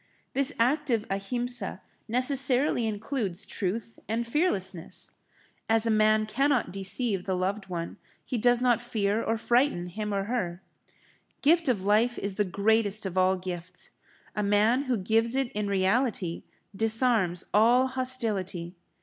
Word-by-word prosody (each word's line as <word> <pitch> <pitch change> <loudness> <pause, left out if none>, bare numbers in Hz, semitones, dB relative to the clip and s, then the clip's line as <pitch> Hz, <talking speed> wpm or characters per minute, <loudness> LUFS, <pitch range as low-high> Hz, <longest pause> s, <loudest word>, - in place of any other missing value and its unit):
This 275 +1 +4
active 250 -2 +1
Ahimsa 240 +6 -2 0.3
necessarily 255 0 +2
includes 210 -3 -3
truth 210 +4 -4
and 230 +2 -1
fearlessness. 195 - -2 0.6
As 225 0 +3
man 215 0 +3
cannot 260 +1 +1
deceive 195 0 -1
the 190 - -1
loved 195 +2 -2
one, 170 -2 -5 0.3
he 245 - -2
does 245 +2 +3
not 245 -2 +3
fear 215 -2 -1
or 225 0 -1
frighten 240 -5 +1
him 210 +4 -5
or 200 -1 -1
her. 190 -6 -3 0.8
Gift 330 +2 +4
of 225 -7 +1
life 220 +4 +2
is 200 0 -3
the 210 - +1
greatest 205 +2 +1
of 190 -2 -4
all 185 0 +3
gifts; 180 -1 -7 0.4
a 210 - 0
man 210 +6 +2
who 255 -3 0
gives 225 +5 +1
it 270 -2 0
in 210 0 -2
reality, 195 -2 0 0.3
disarms 220 -5 +2
all 235 +5 +5
hostility. 225 -10 -3
220 Hz, 135 wpm, -27 LUFS, 195-245 Hz, 0.8 s, all